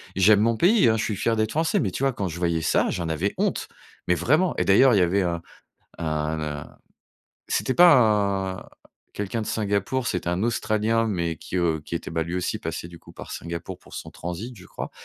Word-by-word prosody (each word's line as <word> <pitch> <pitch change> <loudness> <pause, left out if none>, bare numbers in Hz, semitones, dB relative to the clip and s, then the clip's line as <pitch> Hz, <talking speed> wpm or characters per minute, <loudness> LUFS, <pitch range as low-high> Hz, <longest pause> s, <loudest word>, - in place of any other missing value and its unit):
J'aime 100 +2 +5
mon 115 +1 +2
pays 190 - +5
hein, 110 - +2
je 110 - -1
suis 105 - -2
fier 115 +4 0
d'être 110 0 0
français 160 +1 +1
mais 100 - 0
tu 130 - -4
vois? 135 -1 +2
Quand 100 -4 -3
je 85 -1 -6
voyais 85 -2 0
ça, - - +2
j'en 85 -2 -3
avais 85 +6 -1
honte, - - -1 0.4
mais 90 - +3
vraiment. 155 - +2
Et - - +1
d'ailleurs, 125 +6 +6
il - - +4
y - - +4
avait 90 +3 +2
un 85 -2 -2 0.6
n 85 - -3
un 75 -1 -3 0.7
c'était 130 - 0
pas 105 - +4
un - - -12 0.4
quelqu'un 105 +3 -3
de - - -6
Singapour, 105 +4 -1
c'était 90 -1 -2
un 90 +2 -1
Australien, 115 0 +1
mais 85 -6 -1
qui, 95 - -6
heu, 85 -3 +1
qui - - -6
était 85 - -4
bah, 80 -1 -1
lui 85 - -5
aussi, 90 -1 -2
passé 85 +1 -5
du 85 -1 -12
coup - - -16
par - - -10
Singapour 85 0 -6
pour - - -16
son - - -7
transit, 95 +8 -6
je 90 - -13
crois. - - -7
95 Hz, 225 wpm, -24 LUFS, 85-115 Hz, 0.7 s, d'ailleurs